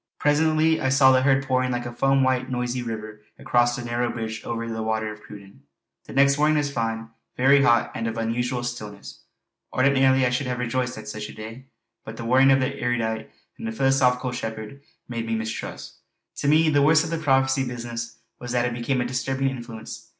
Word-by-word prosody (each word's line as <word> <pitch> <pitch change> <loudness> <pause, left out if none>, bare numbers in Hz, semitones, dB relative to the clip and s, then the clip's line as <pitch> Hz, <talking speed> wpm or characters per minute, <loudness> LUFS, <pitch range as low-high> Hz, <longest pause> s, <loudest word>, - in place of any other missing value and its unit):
Presently 155 +2 +2
I 130 - +1
saw 130 0 +6
the 130 0 +4
herd 135 0 +2
pouring 130 -1 +1
like 120 -1 -2
a 120 - -6
foam 135 +2 +2
white 130 -1 +1
noisy 125 0 -2
river 110 -2 -6 0.2
across 120 0 +2
the 120 -1 -6
narrow 120 +1 -1
bridge 110 -1 -5
over 115 0 -4
the 110 -1 -4
Water 110 0 -1
of 105 - -15
Cruden. 100 -7 -13 0.5
The - - -10
next 140 +1 +4
morning 155 +1 +3
was 145 -1 -1
fine, 115 -1 -2 0.3
very 140 +2 +5
hot, 120 -4 +3
and 115 - -3
of 115 0 -4
an 115 0 -1
unusual 120 +1 -1
stillness. 105 -5 -7 0.5
Ordinarily 130 0 +3
I 125 - +1
should 125 +2 -1
have 125 -1 -2
rejoiced 125 0 -2
at 110 - -9
such 105 -1 -6
a - - -11
day; 115 +5 -9 0.4
but 110 +1 -9
the 115 - -6
warning 130 +3 +5
of 135 0 +5
the 135 +2 -2
erudite 110 -2 -1 0.3
and 110 0 -5
philosophical 130 -2 +2
shepherd 110 +2 -6 0.3
made 115 -2 -4
me 115 - -1
mistrust. 110 0 -6 0.4
To - - -2
me 155 +2 +5
the 145 -2 +3
worst 150 +2 +5
of 165 - -5
the 165 - -1
prophecy 135 -2 +2
business 120 -1 -6 0.2
was 125 0 -6
that 120 -1 +2
it 120 - -1
became 125 +2 -1
a - - -1
disturbing 135 +2 -1
influence. 120 -3 -9
125 Hz, 205 wpm, -24 LUFS, 115-135 Hz, 0.5 s, saw